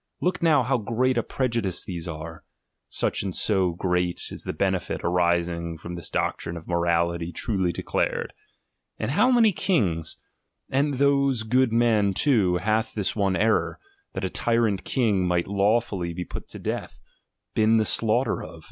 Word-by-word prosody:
Look 180 +1 -1
now, 155 -5 +4
how 130 +1 +1
great 120 +4 0
a 120 - +2
pre 130 +3 -1
judice 105 -7 -1
these 85 -2 -5
are; 80 0 -7 0.5
such - - -1
and 95 -3 -4
so 95 -4 +1
great 90 0 -1
is - - -7
the - - -2
benefit - - -1
arising 85 -1 0
from 85 +2 -8
this 85 -2 -7
doctrine 85 - -2
of 85 - -11
morality 85 0 0
truly 95 -3 0
de - - -6
clared. - - -1 0.7
How 250 - +2
many 235 -4 +5
kings, 90 - 0 0.5
and 140 +1 +1
those 140 -3 +2
good 125 +2 +2
men 110 -4 +2
too, 100 -11 +3
hath 110 +5 -1
this 105 -3 -1
one 100 -3 +1
error, 110 +3 +1 0.4
that - - -3
a - - -1
tyrant 115 -5 +1
king 105 -8 +1
might 90 -1 +1
lawfully 100 -3 0
be 90 0 -4
put - - -8
to - - -9
death, - - -5 0.5
been 110 +1 +3
the 110 - +2
slaughter 115 +5 +1
of! - - -10
100 Hz, 165 wpm, -25 LUFS, 85-120 Hz, 0.7 s, many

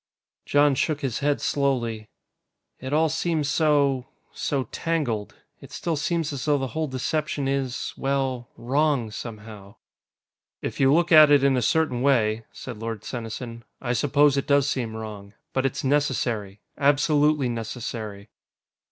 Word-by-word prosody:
Jon 145 0 +4
shook 145 +2 0
his 130 -5 -2
head 145 0 +1
slowly. 120 -6 -1 0.7
"It 130 +1 -6
all 160 +2 +3
seems 160 -1 -1
so... 145 -5 +2 0.3
so 140 -2 -1
tangled. 135 -11 -2 0.2
It - - -13
still 170 -2 -2
seems 160 0 -1
as 135 - -4
though 150 -1 +3
the 135 -1 -3
whole 160 0 -1
deception 140 +2 -2
is... 135 -2 -2
well, 135 -3 -1
wrong, 135 -2 +1
somehow." 105 -3 -9 0.8
"If - - -5
you 135 0 +5
look 170 +3 +3
at 155 -2 +9
it 145 -2 +5
in 140 -1 +4
a 125 - +1
certain 130 -1 +1
way," 115 -5 +2
said 125 -5 -8
Lord 115 -2 -5
Senesin, 115 0 -6 0.2
"I 125 -2 -2
suppose 140 +3 +3
it 140 - -1
does 140 -1 +3
seem 120 -5 -2
wrong. 105 -2 -8 0.2
But 135 0 +2
it's - - -5
necessary. 120 -8 0 0.2
Absolutely 145 0 +3
necessary." 110 -3 -5
135 Hz, 145 wpm, -25 LUFS, 115-145 Hz, 0.8 s, at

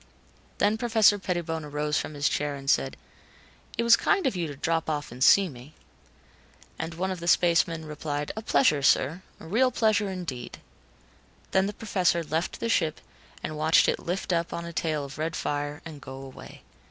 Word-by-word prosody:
Then 210 +2 +2
Professor 220 -3 +4
Pettibone 170 -4 -3
arose 150 +1 -1
from 155 - -5
his 145 0 +1
chair 145 -1 -1
and 135 -1 -10
said, 70 - +1 0.8
"It 235 - +1
was 235 0 +7
kind 390 -3 +1
of 260 - +1
you 175 -2 -1
to 145 - -7
drop 165 +3 -1
off 150 -4 -3
and 125 +2 -2
see 195 +5 +6
me." 135 0 -12 1.0
And 160 +1 -4
one 190 +3 -2
of 185 - -4
the 170 - -6
spacemen 170 -2 +3
replied, 150 -1 -4
"A 220 - -4
pleasure, 210 - +3
sir. 140 +5 +2 0.2
A - - -11
real 235 +10 +3
pleasure 215 -4 +1
indeed." 165 -10 -6 0.9
Then 190 0 +3
the 205 - -4
Professor 185 -6 0
left 160 +2 -2
the 230 - -2
ship 165 -8 +1 0.4
and 155 - -4
watched 155 +2 +4
it - - +1
lift 180 +2 -2
up 170 0 0
on 170 - -4
a 170 - -7
tail 155 -3 -1
of 140 +1 -10
red 160 0 -2
fire 145 0 -3
and 155 -3 -9
go 130 +1 -8
away. 135 0 -11
165 Hz, 190 wpm, -27 LUFS, 150-190 Hz, 1.0 s, was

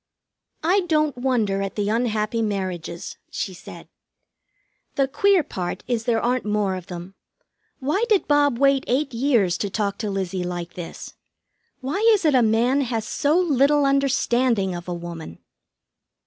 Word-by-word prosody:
"I 360 +5 +3
don't 305 -3 +2
wonder 235 -6 0
at 195 0 -4
the 205 -1 -1
unhappy 220 -1 0
marriages," 185 -5 -4
she 190 - -4
said. 180 - -11 1.1
"The 275 -1 +2
queer 390 +5 +3
part 180 -8 -5
is 230 -2 -1
there 230 -2 +2
aren't 250 +2 0
more 210 -2 0
of 185 -2 -8
them. 175 +1 -8 0.6
Why 305 - 0
did 420 -4 +3
Bob 290 -4 +3
wait 275 0 +3
eight 270 +2 0
years 230 -8 +2
to 205 - -1
talk 200 0 -2
to 215 - -2
Lizzie 190 -2 -2
like 175 -1 -5
this? 175 -2 -8 0.7
Why 275 +9 -2 0.2
is 385 - -3
it 305 - +4
a 255 - +5
man 235 +5 +2
has 230 -4 -2
so 305 +2 +1
little 290 -4 +3
understanding 255 -7 +2
of 175 0 -7
a 180 - -3
woman?" 170 - -8
230 Hz, 155 wpm, -23 LUFS, 195-275 Hz, 1.1 s, a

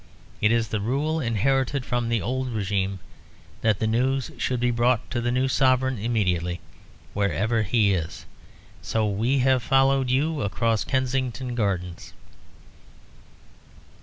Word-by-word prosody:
It 105 - +4
is 115 -1 +1
the 110 - -1
rule, 145 +8 0
inherited 130 +2 0
from 120 -1 -1
the 115 -1 0
old 130 +1 -2
régime, 100 -2 -1 0.6
that 110 -3 +2
the 110 - -1
news 125 +3 0
should 125 -1 -1
be 120 0 +1
brought 120 0 +1
to 120 - -1
the 120 +1 0
new 130 +2 +1
Sovereign 130 -2 +2
immediately, 90 -6 0 0.5
wherever 105 +3 0
he 105 -1 +2
is; 80 -4 -4 0.6
so 110 -1 0
we 115 +7 +1
have 130 -1 +3
followed 135 +1 +2
you 145 +4 +1
across 105 +3 0
Kensington 130 -1 -1
Gardens." 95 -7 -3
120 Hz, 135 wpm, -25 LUFS, 105-130 Hz, 0.6 s, It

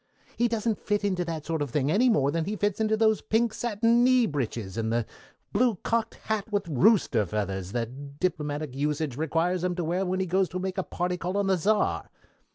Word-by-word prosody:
He 240 - +2
doesn't 225 -1 -1
fit 205 0 -1
into 185 -3 0
that 160 -3 -4
sort 165 -2 -2
of 145 - -1
thing 140 +3 0
any 245 +7 +4
more 145 - +3
than 165 +1 -1
he 210 - -2
fits 205 -1 -1
into 220 0 +2
those 220 -1 +3
pink 225 0 +1
satin 235 +1 +2
knee 255 -1 +5
breeches, 115 - -3
and 110 -1 -1
the 115 -1 +1 0.5
blue 235 +1 +3
cocked 230 -1 0
hat 220 0 -2
with 200 -3 0
rooster 150 - +3
feathers 95 -1 -3
that 135 +4 -5
diplomatic 150 -5 -2
usage 150 -1 -1
requires 165 +4 0
him 180 -1 0
to 175 - -2
wear 175 +4 0
when 185 0 -1
he 190 - +1
goes 185 +1 +1
to 185 - -4
make 190 +1 -3
a - - 0
party 180 +1 -2
call 180 +3 -3
on 200 - +1
the 195 -1 +3
Czar. 205 +5 +1
180 Hz, 215 wpm, -27 LUFS, 145-210 Hz, 0.5 s, knee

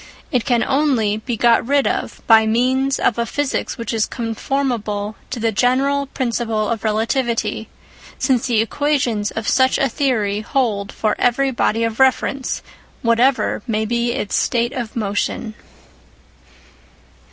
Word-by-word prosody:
It 250 -5 0
can 240 -3 +2
only 265 -7 +1
be 230 +1 -4
got 235 +1 +4
rid 280 +3 +2
of - - -3
by 220 -1 +6
means 260 +4 +1
of 235 - +1
a 235 - +1
physics 290 0 -2
which 230 +1 -4
is 220 -1 +1
conformable 225 -3 -2
to 250 - -4
the 225 0 +1
general 270 +5 +1
principle 230 -5 -1
of 230 -2 -2
relativity, 225 0 -1 0.5
since 255 -3 +1
the 230 -3 +2
equations 240 -5 0
of 225 -1 -5
such 260 0 +3
a 275 - +2
theory 225 -6 0
hold 215 -4 -1
for 215 -1 -1
every 265 +3 +2
body 230 -2 0
of 225 0 -2
reference, 265 0 +1 0.4
whatever 240 +3 +2
may 220 -1 0
be 235 +1 0
its 210 - -2
state 240 +1 +1
of 240 -5 -5
motion. 215 +1 -2
235 Hz, 140 wpm, -19 LUFS, 220-265 Hz, 0.5 s, by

